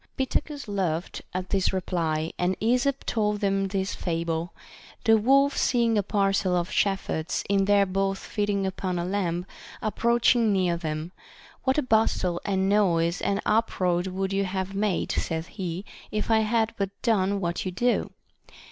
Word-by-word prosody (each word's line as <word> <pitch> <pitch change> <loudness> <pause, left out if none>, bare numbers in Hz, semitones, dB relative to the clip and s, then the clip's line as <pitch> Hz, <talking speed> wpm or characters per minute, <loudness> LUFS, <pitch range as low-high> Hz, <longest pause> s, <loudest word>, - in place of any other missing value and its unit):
Pittacus 280 +1 -2
laughed 185 -4 -2
at 185 0 -4
this 195 -2 +2
reply, 165 -4 -1
and 180 +1 +1
Esop 250 +5 +1
told 210 -2 0
them 195 -1 +1
this 190 0 -2
fable: 165 0 -2 0.5
The 225 - +6
wolf 275 +6 +4
seeing 235 -2 +2
a 205 - +3
parcel 195 -2 +1
of 175 +2 -1
shepherds 195 -5 0
in 195 -1 +2
their 200 0 +4
booth 195 +1 0
feeding 205 -2 -1
upon 185 -1 -2
a 170 - -1
lamb, 180 -2 -1 0.3
approaching 235 +1 +2
near 185 -3 +2
them, 160 0 -4 0.3
— - - -23
What 265 +1 +2
a 300 - +2
bustle 215 -7 +1
and 190 -1 0
noise 175 -4 +2
and 200 0 0
uproar 185 -5 +1
would 190 +1 -2
you 195 0 +1
have 190 +1 -3
made, 200 -2 0
saith 160 0 -2
he, 185 0 -5 0.2
if 215 +2 -2
I 220 - +5
had 220 +1 +1
but 200 -1 -1
done 200 -4 +2
what 175 -2 -2
you 185 - -3
do 240 +7 +1
195 Hz, 160 wpm, -26 LUFS, 180-215 Hz, 0.5 s, The